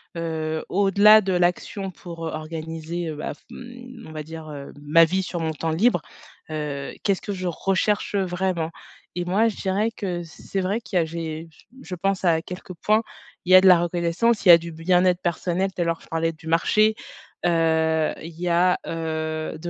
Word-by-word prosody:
heu, 160 -1 -3
au-delà 200 +2 +6
de 190 -2 -1
l'action 180 +3 0
pour, 165 -2 -8
heu, - - -4
organiser, 160 +2 -5
heu, 155 - -5
bah, 150 - -4
f - - -21
mmh, 245 -1 -11
on - - -10
va 155 -1 -5
dire, 160 0 -9
heu, 140 -2 -8
ma 160 +3 +6
vie 190 +4 -1
sur 175 -1 -4
mon 160 -1 -1
temps 160 +1 -2
libre. 175 +2 +2 0.5
Heu, 150 -3 -4
qu'est-ce 200 -2 +1
que 205 - -3
je 185 -1 -4
recherche 195 +4 0
vraiment? 180 -3 -1 0.5
Et 175 0 -2
moi, 200 +6 +2
je 225 - -2
dirais 205 +4 0
que 180 -6 -4
c'est 180 +3 -5
vrai 195 +4 -1
qu'il 190 - -3
y - - +5
a - - 0
j'ai 160 0 -6 0.3
je 180 +1 -6
pense 195 +2 -1
à 165 -2 +3
quelques 180 0 -8
points, 215 +6 +2 0.4
il 180 - -1
y - - +11
a 185 - +10
de 190 - +5
la 180 -2 +8
reconnaissance, 175 +7 0
il - - +5
y - - +13
a 170 - +10
du 170 0 -8
bien-être 180 +2 +2
personnel, 180 +2 -1
tout 180 - -4
à - - +1
l'heure 165 0 -1
je - - -17
parlais 165 0 -1
du 160 0 -14
marché. 215 +6 +3 0.5
Heu, 160 -2 +2
il 165 0 -10
y 180 - -2
a, 175 +1 +3
heu, 160 -1 -3
de 175 +2 -5
175 Hz, 205 wpm, -23 LUFS, 160-190 Hz, 0.5 s, y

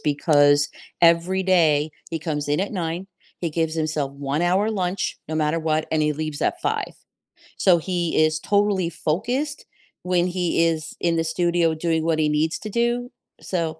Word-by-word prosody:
because 145 -1 +3 0.3
every 170 +3 +4
day 160 -5 +3 0.2
he 165 - -2
comes 150 -2 -3
in 150 +5 +1
at 200 - -2
9:00, 175 0 -3 0.3
he 170 - -2
gives 160 0 -1
himself 155 -3 -2
1 140 +3 -2
hour 190 +5 +2
lunch, 185 -2 -2
no 160 - -3
matter 155 +1 +1
what, 155 -1 0
and 155 -1 +1
he 150 0 +2
leaves 155 -1 -4
at - - 0
5:00. - - -2 0.6
So 180 -2 +5
he 170 -2 0
is 155 0 0
totally 200 -2 +1
focused 245 - -2 0.4
when 180 -1 +1
he 175 -2 +1
is 160 -1 -2
in 170 -1 +1
the 165 - +1
studio 170 0 +1
doing 160 0 -1
what 160 -1 +1
he 150 -1 +2
needs 155 +2 0
to 215 - -6
do, 240 +2 0 0.3
so 165 -3 -3
165 Hz, 175 wpm, -23 LUFS, 155-180 Hz, 0.6 s, So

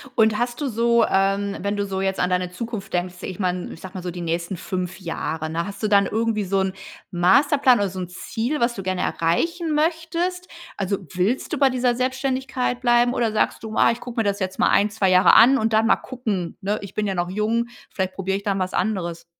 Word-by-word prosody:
Und 220 -1 +4
hast 240 +1 -2
du 290 - 0
so 235 0 +3
ähm, 195 +1 +1
wenn 200 +1 -1
du 205 - 0
so 190 -1 -3
jetzt 190 0 -1
an 180 - +1
deine 180 0 0
Zukunft 205 0 -6
denkst 180 0 -1
ich 185 0 -6
meine, 180 -2 -2
ich - - -13
sage 185 0 -10
mal 185 - -5
so 180 - -3
die 175 +1 -7
nächsten 170 +2 -2
5 185 0 -4
Jahre, 160 -3 -4
ne? 165 +1 -2
Hast 200 0 -8
du 215 - +1
dann 200 -1 +4
irgendwie 220 0 0
so 195 0 0
'n 190 0 0 0.4
Masterplan 250 - +4
oder 200 -1 +1
so 185 0 -7
'n 180 - -4
Ziel, 230 +9 -3
was 235 0 +1
du 195 - -6
gerne 185 -1 -1
erreichen 325 - 0
möchtest? 335 +3 -1 0.3
Also, 200 0 -1 0.2
willst 200 - 0
du - - 0
bei 275 -1 +4
dieser 250 -1 +1
Selbständigkeit 260 0 -1
bleiben, 240 0 +3
oder 230 -2 +1
sagst 215 - 0
du: 220 0 -6
„Ah, - - +5
ich 230 - -4
gucke 240 -1 -5
mir - - +3
das 200 -1 -1
jetzt 190 -1 -4
mal - - +4
1, 205 +1 +3
2 205 -3 +1
Jahre 185 +1 +6
an 260 +4 +7
und 225 -1 0
dann 220 +1 +4
mal - - +5
gucken, 215 -9 -4
ne, 205 +2 -1
ich 200 - -9
bin 210 -1 -1
ja 195 - -2
noch 175 0 -1
jung, 220 +4 0 0.2
vielleicht 190 -1 -3
probiere 195 0 -2
ich 200 - -9
dann 195 -1 0
was 185 0 -2
anderes.” 180 -4 -2
205 Hz, 240 wpm, -23 LUFS, 185-240 Hz, 0.4 s, an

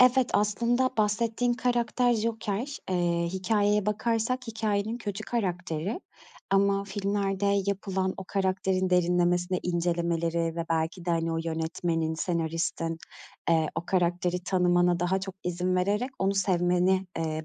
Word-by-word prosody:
Evet, 255 0 +5
aslında 235 +5 +2
bahsettiğin 225 +3 +1
karakter 245 0 +1
Joker. 225 +3 -2
Eee, 170 -1 +1
hikâyeye 205 +2 +1
bakarsak 225 +4 0
hikâyenin 220 0 -1
kötü 210 -2 -5
karakteri 180 - -2 0.5
ama 200 0 +3
filmlerde 200 0 -1 0.2
yapılan 190 -1 -1
o 190 - -6
karakterin 190 -1 0
derinlemesine 180 0 +2
incelemeleri 170 -1 0
ve 170 - -1
belki 165 +2 -1
de, 175 - -1
hani, 165 0 0
o 165 - -1
yönetmenin, 165 0 -1
senaristin, 165 0 -2 0.5
eee, 160 -2 +3
o 165 +2 -4
karakteri 180 0 0
tanımana 175 -1 +3
daha 185 +2 +1
çok 195 -1 -6
izin 180 +1 0
vererek 205 +8 +1
onu 195 +1 +1
sevmeni, 185 0 +2
eee, 160 -1 -2
185 Hz, 125 wpm, -28 LUFS, 175-210 Hz, 0.5 s, Evet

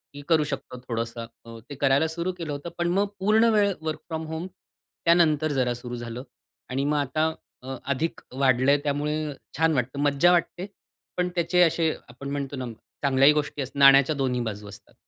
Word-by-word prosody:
मी 145 - -8
करू 160 -2 +4
शकतो 135 -3 -6
थोडंसं. 115 0 -3 0.2
अ, 115 0 -10
ते 145 - -7
करायला 140 +3 +2
सुरू 170 +3 -2
केलं 165 -3 -5
होतं. 145 +4 -5
पण 175 0 0
मग 200 0 +2
पूर्ण 220 +4 +4
वेळ 205 -2 +3
वर्क 155 -1 -3
फ्रॉम 160 -1 -4
होम 160 +3 -5 0.6
त्यानंतर 155 -3 +3
जरा 125 -3 +1
सुरू 120 0 -7
झालं 120 +1 -6 0.5
आणि 135 +2 -1
मग 150 0 +1
आता 145 +3 0 0.4
अ, 135 +1 -5 0.2
अधिक 150 +5 -2 0.2
वाढलंय 130 +1 +4
त्यामुळे 150 +1 -1 0.2
छान 160 0 +3
वाटतं, 130 +1 -2
मज्जा 145 +4 +4
वाटते, 175 +1 0 0.5
पण 180 0 +1
त्याचे 180 +1 +2
असे 165 -1 +3 0.2
आपण 140 +3 -8
म्हणतो 140 -1 -3
ना, 130 - -4 0.4
चांगल्याही 140 +1 +5
गोष्टी 150 -1 -2
असतात, 135 +2 -6
नाण्याच्या 140 +2 +7
दोन्ही 130 -3 -1
बाजू 105 -3 -5
असतात. 100 - -14
145 Hz, 180 wpm, -25 LUFS, 130-160 Hz, 0.6 s, नाण्याच्या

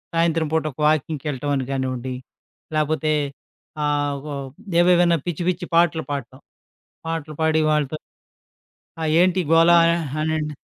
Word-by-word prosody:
సాయంత్రం 165 -1 +2
పూట 160 - +2
ఒక - - -22
వాకింగ్‌కెళ్ళటం 150 -2 -1
అని 130 -1 -2
కానివ్వండి, 130 -1 -3 0.6
లేపోతే 155 0 +1 0.7
ఆహ్, 145 -1 0
వవ్ 140 -2 -5 0.3
ఏవేమైనా 175 -1 +4
పిచ్చి, 175 0 -2
పిచ్చి 180 0 -2
పాటలు 165 -1 +3
పాడటం. 130 -2 -5 0.7
పాటలు 160 -2 -4
పాడి 160 0 +3
వాళ్ళతో 150 0 0 1.0
"ఆ! - - -4 0.2
ఏంటి 185 +1 +3
గోలా" 165 +1 +6 0.2
అ - - +1 0.2
అనన్ 155 -1 -1
155 Hz, 125 wpm, -22 LUFS, 145-165 Hz, 1.0 s, గోలా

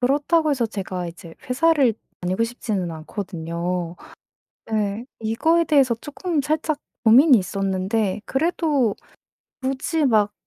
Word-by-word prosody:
그렇다고 295 +5 +2
해서 255 -5 +1
제가 190 -4 -4
이제 170 -1 -10
회사를 275 -2 +3 0.3
다니고 185 +5 0
싶지는 215 -6 -3
않거든요. 170 0 -4 0.7
네. 215 0 -1 0.2
이거에 320 +10 +2
대해서 275 -6 +4
조금 310 +1 -2
살짝 310 +1 -1 0.3
고민이 250 +4 +7
있었는데 195 +2 -1
그래도 285 - +1 0.7
굳이 270 +4 -1
막 215 -5 +3
225 Hz, 270 characters per minute, -22 LUFS, 190-285 Hz, 0.7 s, 고민이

